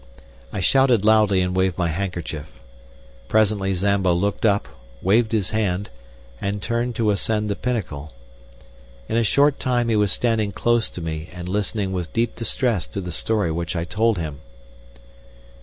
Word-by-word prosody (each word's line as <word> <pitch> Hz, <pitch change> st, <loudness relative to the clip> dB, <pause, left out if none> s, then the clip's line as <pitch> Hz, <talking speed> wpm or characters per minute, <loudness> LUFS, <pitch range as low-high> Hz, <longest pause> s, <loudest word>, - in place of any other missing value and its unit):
I -, -, -3 dB
shouted 125 Hz, -1 st, +4 dB
loudly 105 Hz, -3 st, +4 dB
and 90 Hz, 0 st, -1 dB
waved 95 Hz, -1 st, +1 dB
my 85 Hz, -2 st, +1 dB
handkerchief. 80 Hz, -3 st, -4 dB, 0.8 s
Presently 105 Hz, -3 st, +2 dB
Zambo 95 Hz, -1 st, +2 dB
looked 100 Hz, +5 st, +1 dB
up, 100 Hz, -1 st, +1 dB, 0.4 s
waved 110 Hz, +4 st, +3 dB
his 105 Hz, -4 st, 0 dB
hand, 100 Hz, -3 st, -1 dB, 0.5 s
and 100 Hz, +1 st, -2 dB
turned 120 Hz, +3 st, -2 dB
to 110 Hz, -2 st, +2 dB
ascend 105 Hz, +1 st, 0 dB
the -, -, 0 dB
pinnacle. 85 Hz, -, -3 dB, 1.0 s
In -, -, -2 dB
a -, -, +4 dB
short 140 Hz, +6 st, +3 dB
time 120 Hz, -2 st, +1 dB
he 115 Hz, -, +2 dB
was 105 Hz, -3 st, +2 dB
standing 110 Hz, -3 st, 0 dB
close 120 Hz, -1 st, +1 dB
to 90 Hz, -, -8 dB
me 80 Hz, +1 st, -4 dB
and 90 Hz, -1 st, -7 dB
listening 100 Hz, 0 st, -1 dB
with 90 Hz, -3 st, -4 dB
deep 115 Hz, 0 st, 0 dB
distress 115 Hz, -3 st, 0 dB
to -, -, -5 dB
the 90 Hz, -2 st, -5 dB
story 105 Hz, -1 st, 0 dB
which 85 Hz, +2 st, -3 dB
I 85 Hz, -, -1 dB
told 110 Hz, +4 st, +1 dB
him. 75 Hz, -4 st, -4 dB
100 Hz, 160 wpm, -22 LUFS, 90-110 Hz, 1.0 s, shouted